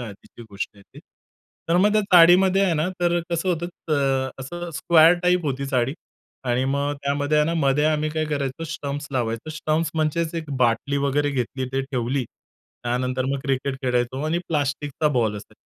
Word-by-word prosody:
आधीची 115 Hz, +1 st, -10 dB
गोष्ट 100 Hz, +1 st, -5 dB
आहे. 100 Hz, -, -17 dB, 0.7 s
तर 170 Hz, -, +3 dB
मग 205 Hz, +2 st, +4 dB
त्या 215 Hz, 0 st, +3 dB
चाळीमध्ये 180 Hz, +3 st, +7 dB
आहे 180 Hz, -, +1 dB
ना, 155 Hz, +3 st, 0 dB
तर 175 Hz, 0 st, +2 dB
कसं 170 Hz, +2 st, -1 dB
होतं 170 Hz, -1 st, 0 dB
त 175 Hz, -2 st, -13 dB
अ, 135 Hz, -2 st, +1 dB
असं 175 Hz, +6 st, -6 dB
स्क्वेअर 165 Hz, +2 st, +6 dB
टाइप 180 Hz, -1 st, +2 dB
होती 140 Hz, 0 st, -2 dB
चाळी 130 Hz, 0 st, 0 dB, 0.5 s
आणि 125 Hz, +1 st, +1 dB
मग 140 Hz, +2 st, 0 dB
त्यामध्ये 145 Hz, +2 st, +1 dB
आहे 150 Hz, -, +3 dB
ना 165 Hz, -, 0 dB
मध्ये 145 Hz, -2 st, +2 dB
आम्ही 155 Hz, 0 st, +1 dB
काय 155 Hz, 0 st, -1 dB
करायचो 140 Hz, +1 st, -3 dB
स्टम्प्स 145 Hz, -2 st, -5 dB
लावायचो. 115 Hz, +2 st, -2 dB
स्टम्प्स 155 Hz, +1 st, -1 dB
म्हणजेच 160 Hz, +1 st, 0 dB
एक 160 Hz, -3 st, -5 dB
बाटली 120 Hz, +4 st, +1 dB
वगैरे 145 Hz, +1 st, +1 dB
घेतली 130 Hz, 0 st, -2 dB
ते 135 Hz, 0 st, 0 dB
ठेवली. 130 Hz, -1 st, -2 dB, 0.6 s
त्यानंतर 125 Hz, +1 st, -1 dB
मग 140 Hz, -, -1 dB
क्रिकेट 135 Hz, 0 st, -1 dB
खेळायचो 125 Hz, +1 st, 0 dB
आणि 165 Hz, +2 st, 0 dB
प्लास्टिकचा 145 Hz, 0 st, -1 dB
बॉल 110 Hz, -4 st, +1 dB
असायचा. 105 Hz, -, -12 dB
145 Hz, 175 wpm, -23 LUFS, 130-160 Hz, 0.7 s, चाळीमध्ये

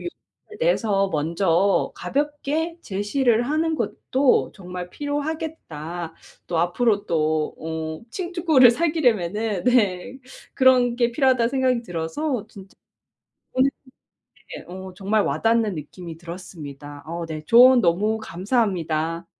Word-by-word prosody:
용기를 350 Hz, -, -5 dB, 0.5 s
내서 215 Hz, -, +2 dB
먼저 170 Hz, +4 st, +1 dB
가볍게 295 Hz, +3 st, -2 dB
제시를 225 Hz, -, +1 dB
하는 315 Hz, +5 st, 0 dB
것도 260 Hz, +2 st, +1 dB
정말 180 Hz, -2 st, -7 dB
필요하겠다. 285 Hz, -, -5 dB, 0.3 s
또 170 Hz, -, -2 dB
앞으로 200 Hz, +5 st, +1 dB
또 155 Hz, -1 st, 0 dB
어 160 Hz, 0 st, -5 dB
친구 345 Hz, -3 st, 0 dB
를 245 Hz, -2 st, +10 dB
사귀려면은 225 Hz, -, 0 dB
네 245 Hz, -1 st, +1 dB, 0.4 s
그런 255 Hz, -2 st, +4 dB
게 240 Hz, -1 st, +2 dB
필요하다는 255 Hz, -4 st, +2 dB
생각이 260 Hz, -2 st, +1 dB
들어서 215 Hz, -, -3 dB
진짜 195 Hz, -2 st, -14 dB, 0.8 s
오늘 260 Hz, +1 st, +3 dB
예 -, -, -46 dB, 0.9 s
어 185 Hz, +1 st, -8 dB
정말 205 Hz, +3 st, +1 dB
와닿는 225 Hz, -3 st, +1 dB
느낌이 165 Hz, +2 st, -8 dB
들었습니다. 150 Hz, -5 st, -9 dB
어 170 Hz, +1 st, -4 dB
네. 155 Hz, -2 st, -6 dB
조언 250 Hz, +4 st, +7 dB
너무 210 Hz, +3 st, +2 dB
감사합니다. 170 Hz, -6 st, -1 dB
210 Hz, 255 characters per minute, -23 LUFS, 170-260 Hz, 0.9 s, 를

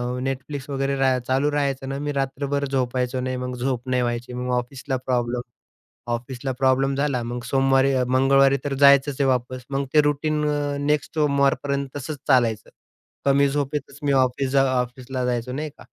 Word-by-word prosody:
अ, 125 Hz, -, -4 dB
Netflix 135 Hz, +1 st, -4 dB
वगैरे 135 Hz, 0 st, -1 dB
राहाय 130 Hz, -1 st, +2 dB
चालू 135 Hz, +3 st, +1 dB
राहायचं 140 Hz, -2 st, -1 dB
ना, 135 Hz, -, -3 dB
मी 145 Hz, 0 st, -2 dB
रात्रभर 140 Hz, +1 st, -1 dB
झोपायचो 130 Hz, -1 st, -1 dB
नाही. 130 Hz, 0 st, -2 dB
मग 125 Hz, 0 st, -4 dB
झोप 125 Hz, 0 st, -2 dB
नाही 125 Hz, -1 st, +2 dB
व्हायची, 120 Hz, 0 st, -3 dB
मग 125 Hz, 0 st, -3 dB
ऑफिसला 130 Hz, +2 st, -3 dB
प्रॉब्लेम, 120 Hz, -1 st, 0 dB, 0.7 s
ऑफिसला 125 Hz, +2 st, -4 dB
प्रॉब्लेम 135 Hz, +1 st, +2 dB
झाला, 140 Hz, -3 st, 0 dB
मग 120 Hz, +1 st, -5 dB
सोमवारी 135 Hz, +1 st, +3 dB
अ, 130 Hz, -1 st, +2 dB
मंगळवारी 135 Hz, +1 st, +4 dB
तर 140 Hz, -1 st, -1 dB
जायचंच 140 Hz, 0 st, +5 dB
आहे 140 Hz, -, +3 dB
वापस. 125 Hz, 0 st, -1 dB
मग 140 Hz, 0 st, -1 dB
ते 150 Hz, -, +7 dB
रुटीन 150 Hz, +1 st, 0 dB
अ, 145 Hz, -1 st, -1 dB
नेक्स्ट 150 Hz, 0 st, 0 dB
सोमवारपर्यंत 140 Hz, -2 st, +1 dB
तसंच 145 Hz, +1 st, -5 dB
चालायचं. 120 Hz, -5 st, +2 dB, 0.5 s
कमी 140 Hz, 0 st, +4 dB
झोपेतच 145 Hz, 0 st, -3 dB
मी 145 Hz, -1 st, +1 dB
ऑफिस 130 Hz, +1 st, -1 dB
जा 135 Hz, 0 st, +4 dB, 0.2 s
ऑफिसला 125 Hz, +1 st, -4 dB
जायचो. 125 Hz, 0 st, -2 dB
नाही 150 Hz, +3 st, -4 dB
का. -, -, -17 dB
135 Hz, 175 wpm, -23 LUFS, 125-140 Hz, 0.7 s, ते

